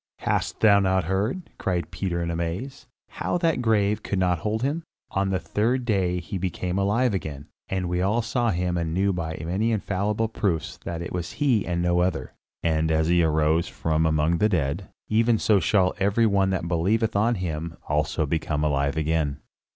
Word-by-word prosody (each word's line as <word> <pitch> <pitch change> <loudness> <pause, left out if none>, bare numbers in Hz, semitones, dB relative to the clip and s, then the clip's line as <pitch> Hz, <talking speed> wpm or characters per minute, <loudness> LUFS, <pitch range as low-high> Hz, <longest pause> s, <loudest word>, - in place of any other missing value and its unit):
"Hast - - -1
thou 100 -2 +6
not 95 -2 +2
heard," 100 - -2
cried 90 -4 -1
Peter 85 -3 -2
in 85 - -2
amaze, 85 +11 -4 0.2
"how - - -2
that 165 -2 +1
the - - -2
grave 105 -3 +2
could 100 - -3
not 90 -2 +2
hold 110 +7 -2
him? 145 +5 0 0.3
On 95 0 0
the 95 - +1
third 120 +7 0
day 95 -5 +1
he 90 +3 -5
became 90 0 -2
alive 105 +5 +2
again, 75 -6 -4 0.2
and 95 -1 -1
we 90 +1 0
all 105 +5 +1
saw 120 +1 0
him 90 -2 0
and 85 -1 -2
knew 100 +1 +2
by 80 -2 -4
many 100 +7 0
infallible 105 +1 0
proofs 95 -7 -2
that 85 0 -4
it - - -6
was 90 -2 -4
he 130 -9 +1
and 85 0 -1
no 90 0 +2
other. 90 +1 -1 0.3
And 80 -1 +1
as 80 +1 +2
he 85 0 +4
arose 80 +1 +2
from 80 0 0
among 80 +2 +2
the 105 - +3
dead, 85 0 -1 0.2
even 115 +1 +3
so 105 -1 +3
shall 95 -2 +2
every 100 +4 +3
one 100 -3 +3
that 95 -3 -1
believeth 100 +7 +1
on 115 +4 +3
him 85 -3 -4
also 75 +1 0
become 75 0 -1
alive 70 0 0
again. 80 -2 0
90 Hz, 190 wpm, -25 LUFS, 80-105 Hz, 0.3 s, thou